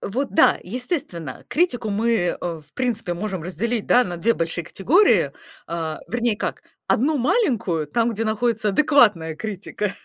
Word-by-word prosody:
вот, 260 Hz, +7 st, -3 dB
да, -, -, +5 dB
естественно, 220 Hz, -, -4 dB
критику 270 Hz, -10 st, 0 dB
мы, 220 Hz, +4 st, 0 dB
э, 185 Hz, -7 st, +1 dB
в 160 Hz, -4 st, -6 dB
принципе 230 Hz, -8 st, -2 dB
можем 190 Hz, -2 st, -4 dB
разделить, 210 Hz, +7 st, -1 dB
да, 250 Hz, -, +5 dB
на 175 Hz, -1 st, -5 dB
2 230 Hz, +7 st, +2 dB
большие 165 Hz, 0 st, -1 dB
категории, 320 Hz, -, +3 dB, 0.4 s
а, 160 Hz, -2 st, -4 dB
вернее, 235 Hz, -2 st, 0 dB
как, -, -, -4 dB, 0.3 s
1 295 Hz, +6 st, +2 dB
маленькую, 240 Hz, -, +1 dB
там, 230 Hz, +10 st, +1 dB
где 225 Hz, 0 st, -2 dB
находится 220 Hz, 0 st, 0 dB
адекватная 210 Hz, -, +3 dB
критика. 205 Hz, +1 st, -4 dB
215 Hz, 150 wpm, -22 LUFS, 175-245 Hz, 0.4 s, да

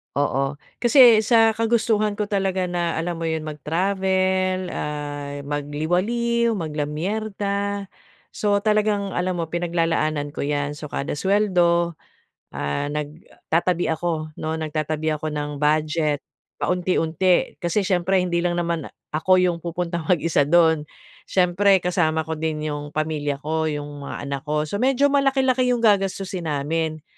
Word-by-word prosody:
Oo, 140 Hz, 0 st, 0 dB, 0.2 s
kasi 240 Hz, -3 st, +7 dB
sa 225 Hz, -1 st, +4 dB
kagustuhan 220 Hz, -2 st, +1 dB
ko 210 Hz, -, 0 dB
talaga 190 Hz, -2 st, 0 dB
na 175 Hz, -2 st, -1 dB
alam 175 Hz, +1 st, -2 dB
mo 165 Hz, -, -5 dB
yun 160 Hz, -1 st, -2 dB
mag-travel, 185 Hz, +4 st, 0 dB
ah, 145 Hz, -3 st, -5 dB
magliwaliw, 180 Hz, +12 st, 0 dB
mag-lamierda, 200 Hz, +5 st, -2 dB, 0.4 s
so, 205 Hz, -1 st, 0 dB
talagang 210 Hz, -1 st, +1 dB
alam 180 Hz, 0 st, -1 dB
mo, 165 Hz, -, -2 dB
pinaglalaanan 165 Hz, -3 st, -1 dB
ko -, -, -2 dB
'yan. 145 Hz, 0 st, -1 dB
So, 150 Hz, -1 st, -9 dB
kada 140 Hz, -, -3 dB
suweldo, 175 Hz, -2 st, +2 dB, 0.6 s
ah, 70 Hz, -, -2 dB
nagtatabi 160 Hz, +3 st, -2 dB
ako 160 Hz, -1 st, -3 dB
'no, 160 Hz, +1 st, -2 dB
nagtatabi 155 Hz, 0 st, -2 dB
ako 155 Hz, +1 st, -3 dB
ng 150 Hz, -1 st, -4 dB
budget 150 Hz, 0 st, +1 dB, 0.3 s
paunti-unti. 180 Hz, -3 st, +1 dB
Kasi 175 Hz, +4 st, 0 dB
siyempre 185 Hz, 0 st, +1 dB
hindi 180 Hz, -2 st, +1 dB
lang 175 Hz, 0 st, 0 dB
naman 170 Hz, -3 st, -2 dB, 0.2 s
ako 185 Hz, +4 st, +3 dB
yung 180 Hz, -2 st, +2 dB
pupuntang 170 Hz, -1 st, -3 dB
mag-isa 165 Hz, -5 st, +2 dB
do'n. 160 Hz, -2 st, +4 dB, 0.4 s
Siyempre 190 Hz, +2 st, +4 dB
kasama 160 Hz, -3 st, +1 dB
ko 160 Hz, -1 st, -5 dB
din 155 Hz, -1 st, -2 dB
'yong 145 Hz, 0 st, -5 dB
pamilya 150 Hz, -2 st, -2 dB
ko, 160 Hz, +2 st, -1 dB
'yong 145 Hz, -1 st, -5 dB
mga -, -, -5 dB
anak 140 Hz, 0 st, -3 dB
ko. 150 Hz, 0 st, +1 dB
So, 200 Hz, +8 st, -4 dB
medyo 270 Hz, +2 st, +3 dB
malaki-laki 265 Hz, -2 st, +2 dB
yung 235 Hz, -, -3 dB
gagastusin 195 Hz, -4 st, +1 dB
namin. 155 Hz, +2 st, -2 dB
170 Hz, 130 wpm, -23 LUFS, 150-195 Hz, 0.6 s, kasi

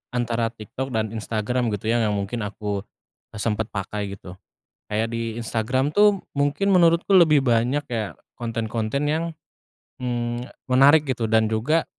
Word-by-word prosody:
antara 120 Hz, -1 st, 0 dB
TikTok 115 Hz, +3 st, -6 dB
dan 110 Hz, -1 st, 0 dB
Instagram 115 Hz, +2 st, -1 dB
gitu 110 Hz, +3 st, -2 dB
ya, 120 Hz, -, +2 dB
yang 105 Hz, -2 st, +1 dB
mungkin 100 Hz, +4 st, -3 dB
aku 105 Hz, -1 st, -4 dB, 0.5 s
sempat 110 Hz, +1 st, -1 dB
pakai 100 Hz, 0 st, -4 dB
gitu. 95 Hz, -1 st, -12 dB, 0.5 s
Kayak 110 Hz, +2 st, 0 dB
di 115 Hz, -1 st, -3 dB
Instagram 125 Hz, +5 st, 0 dB
tuh 205 Hz, +3 st, +4 dB, 0.2 s
mungkin 145 Hz, +8 st, +1 dB
menurutku 180 Hz, +1 st, +5 dB
lebih 155 Hz, -5 st, +6 dB
banyak 125 Hz, +3 st, +2 dB
kayak 110 Hz, -4 st, -3 dB, 0.2 s
konten-konten 115 Hz, +4 st, -2 dB
yang, 160 Hz, +2 st, 0 dB, 0.8 s
mmm, 120 Hz, 0 st, -2 dB, 0.2 s
menarik 140 Hz, +4 st, +5 dB
gitu, 120 Hz, -5 st, -2 dB
dan 110 Hz, 0 st, +4 dB
juga 115 Hz, +10 st, +1 dB
115 Hz, 140 wpm, -23 LUFS, 110-135 Hz, 0.8 s, lebih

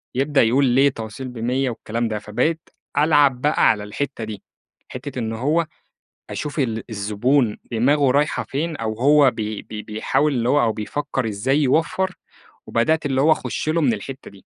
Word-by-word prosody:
يبدأ 140 Hz, +2 st, +2 dB
يقول 125 Hz, +5 st, +3 dB
"ليه 135 Hz, +3 st, +4 dB
توصيل 115 Hz, +2 st, -7 dB
ب100؟!" 130 Hz, +2 st, 0 dB
والكلام 115 Hz, 0 st, -3 dB
ده، 110 Hz, -1 st, -3 dB
فبقيت 155 Hz, +11 st, -2 dB, 0.3 s
ألعب 145 Hz, -4 st, +4 dB
بقى 150 Hz, +1 st, +3 dB
على 105 Hz, -2 st, +1 dB
الحتّة 115 Hz, +3 st, -4 dB
دي، 105 Hz, -2 st, -7 dB, 0.4 s
حتّة -, -, -6 dB
إن 110 Hz, -1 st, -3 dB
هو 150 Hz, +8 st, 0 dB, 0.6 s
أشوف 150 Hz, 0 st, -4 dB
ال 115 Hz, -4 st, -1 dB
الزبون 110 Hz, +3 st, +1 dB
دماغُه 135 Hz, +4 st, +3 dB
رايحة 145 Hz, +3 st, +1 dB
فين 155 Hz, +4 st, -3 dB
أو 110 Hz, -1 st, -2 dB
هو 140 Hz, 0 st, +5 dB
بي 110 Hz, -1 st, -4 dB
بي 105 Hz, -1 st, -7 dB
بيحاول 115 Hz, +7 st, 0 dB
اللي 120 Hz, -1 st, 0 dB
هو 145 Hz, -, +4 dB
أو 115 Hz, -2 st, +2 dB
بيفكّر 130 Hz, +2 st, -3 dB
إزاي 110 Hz, +7 st, 0 dB
يوفّر، 170 Hz, +7 st, +1 dB, 0.5 s
وبدأت 155 Hz, +7 st, +1 dB
اللي 135 Hz, -2 st, +1 dB
هو 155 Hz, +3 st, +5 dB
أخُشّ 155 Hz, -, -1 dB
له 165 Hz, +1 st, +1 dB
من 130 Hz, -5 st, +3 dB
الحتّة 130 Hz, +3 st, -7 dB
دي، 100 Hz, -1 st, -18 dB
130 Hz, 170 wpm, -21 LUFS, 110-145 Hz, 0.6 s, هو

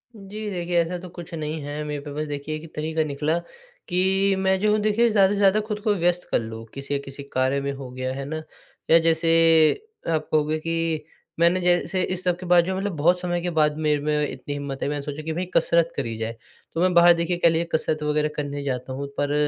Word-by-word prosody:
जी 210 Hz, +1 st, -7 dB
देखिए 175 Hz, -2 st, -2 dB
ऐसा 170 Hz, +2 st, -3 dB
तो 180 Hz, +1 st, -9 dB
कुछ 175 Hz, -1 st, -9 dB
नहीं 155 Hz, 0 st, -4 dB
है 145 Hz, +1 st, -5 dB
मेरे 150 Hz, -1 st, -4 dB
पे 145 Hz, 0 st, -8 dB
बस 150 Hz, +1 st, -3 dB
देखिए 145 Hz, +1 st, -4 dB
एक 155 Hz, +1 st, -10 dB
तरीका 155 Hz, +1 st, -1 dB
निकला 150 Hz, +2 st, -1 dB, 0.5 s
कि, 190 Hz, +2 st, +2 dB
मैं 190 Hz, 0 st, +2 dB
जो 210 Hz, +2 st, +2 dB
हूँ 215 Hz, -, +2 dB
देखिए 215 Hz, +3 st, +3 dB
ज़्यादा 200 Hz, -3 st, +5 dB
से -, -, -1 dB
ज़्यादा 200 Hz, +1 st, +4 dB
खुद 210 Hz, -1 st, -3 dB
को 210 Hz, 0 st, +1 dB
व्यस्त 175 Hz, -1 st, 0 dB
कर -, -, +3 dB
लूँ, 115 Hz, 0 st, -7 dB
किसी 140 Hz, +1 st, -3 dB
किसी 140 Hz, 0 st, -8 dB
कार्य 130 Hz, 0 st, 0 dB
में 140 Hz, 0 st, -2 dB
हो 135 Hz, -2 st, -8 dB
गया 130 Hz, 0 st, -3 dB
है 135 Hz, +1 st, -5 dB
ना? 155 Hz, +3 st, -4 dB, 0.5 s
या 165 Hz, -, +7 dB
जैसे 165 Hz, -1 st, +5 dB, 0.4 s
आप 155 Hz, -2 st, 0 dB
कहोगे 155 Hz, 0 st, +2 dB
कि 165 Hz, -1 st, -2 dB, 0.3 s
मैंने 170 Hz, +2 st, +4 dB
जैसे 180 Hz, +1 st, +2 dB
इस 185 Hz, 0 st, -2 dB
सब 180 Hz, -1 st, +1 dB
के 185 Hz, -, -8 dB
बाद 175 Hz, -1 st, +5 dB
जो 190 Hz, +1 st, -2 dB
मतलब 195 Hz, -2 st, -3 dB
बहुत 175 Hz, +5 st, +3 dB
समय 175 Hz, -1 st, -1 dB
के 175 Hz, -, -2 dB
बाद 150 Hz, 0 st, +3 dB
मेरे 150 Hz, -1 st, +1 dB
में 150 Hz, 0 st, 0 dB
इतनी 135 Hz, +2 st, -6 dB
हिम्मत 140 Hz, -1 st, -5 dB
है -, -, 0 dB
मैंने 145 Hz, 0 st, -2 dB
सोचा 145 Hz, +2 st, -6 dB
कि 160 Hz, +1 st, -3 dB
भाई 180 Hz, +3 st, -2 dB
कसरत 170 Hz, 0 st, +3 dB
करी 115 Hz, -5 st, -3 dB
जाए, 115 Hz, +1 st, -4 dB, 0.4 s
तो 165 Hz, -, -1 dB
मैं 185 Hz, 0 st, +3 dB
बाहर 170 Hz, 0 st, +7 dB
देखिए 170 Hz, +1 st, -1 dB
ख 175 Hz, -, -1 dB
लीजिए 165 Hz, +1 st, +2 dB
कसरत 155 Hz, -1 st, 0 dB
वगैरह 150 Hz, 0 st, +1 dB
करने 145 Hz, -1 st, -4 dB
जाता 130 Hz, -1 st, -3 dB
हूँ 140 Hz, +2 st, -4 dB
पर 145 Hz, 0 st, 0 dB
160 Hz, 235 wpm, -24 LUFS, 145-180 Hz, 0.5 s, या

